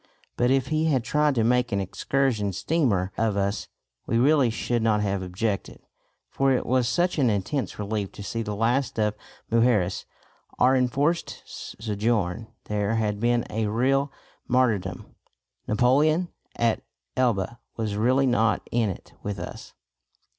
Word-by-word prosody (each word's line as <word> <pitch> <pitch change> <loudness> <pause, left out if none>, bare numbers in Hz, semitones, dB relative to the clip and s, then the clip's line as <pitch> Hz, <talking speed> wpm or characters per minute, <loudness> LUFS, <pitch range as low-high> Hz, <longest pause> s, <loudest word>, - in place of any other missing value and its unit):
But 120 - +2
if 135 0 +2
he 155 0 +1
had 135 -7 +2
tried 150 +3 +2
to 115 - +2
make 125 +1 +2
an 100 - +1
excursion 105 +1 0
steamer 105 - +1
of 110 -3 +1
us, 100 +1 -1 0.4
we 115 - +1
really 135 0 +4
should 120 +1 -1
not 110 -2 +2
have 100 -2 -1
objected, 95 +3 -3 0.5
for 135 0 +1
it 130 - +1
was 125 -1 +2
such 175 +5 +1
an 130 -4 +4
intense 105 +7 -2
relief 105 -1 -3
to 100 - -8
see 115 +3 -3
the 105 -2 -3
last 120 +6 0
of 105 -1 +1 0.4
Mujeres. 115 -6 +2 0.5
Our 130 +1 +4
enforced 140 +6 0
sojourn 105 -1 -2 0.2
there 105 +1 -1
had 105 -2 0
been 120 +1 +2
a 110 0 -1
real 135 +6 +1 0.4
martyrdom. 105 -8 0 0.5
Napoleon 150 +10 +3 0.3
at 115 -1 +1 0.3
Elba 120 -3 0 0.2
was 110 -3 -2
really 130 +6 +3
not 115 -3 +1
in 115 -3 +2
it 95 - -8
with 105 -1 -4
us. 90 - -8
115 Hz, 145 wpm, -25 LUFS, 105-130 Hz, 0.5 s, really